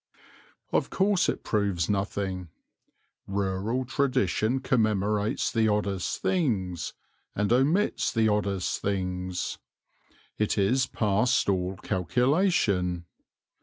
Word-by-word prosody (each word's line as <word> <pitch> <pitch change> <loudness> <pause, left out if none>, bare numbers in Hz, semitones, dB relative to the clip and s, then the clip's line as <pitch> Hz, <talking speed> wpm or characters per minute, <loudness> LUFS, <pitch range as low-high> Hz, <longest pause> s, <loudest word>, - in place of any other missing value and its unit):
Of - - +1
course 195 -1 +2
it - - -3
proves 100 -6 0
nothing. 95 -3 -2 0.8
Rural 100 +6 -1
tradition 130 - +1
commemorates 105 -4 +1
the 115 -2 +2
oddest 100 -3 -1
things 100 - 0 0.4
and 105 +2 +1
omits 155 - +2
the 110 -1 +2
oddest 100 -3 0
things. 90 -2 -2 0.8
It 105 0 +1
is 125 +6 +2
past 115 +4 +1
all 95 -1 0
calculation. 100 - +1
105 Hz, 90 wpm, -27 LUFS, 95-125 Hz, 0.8 s, course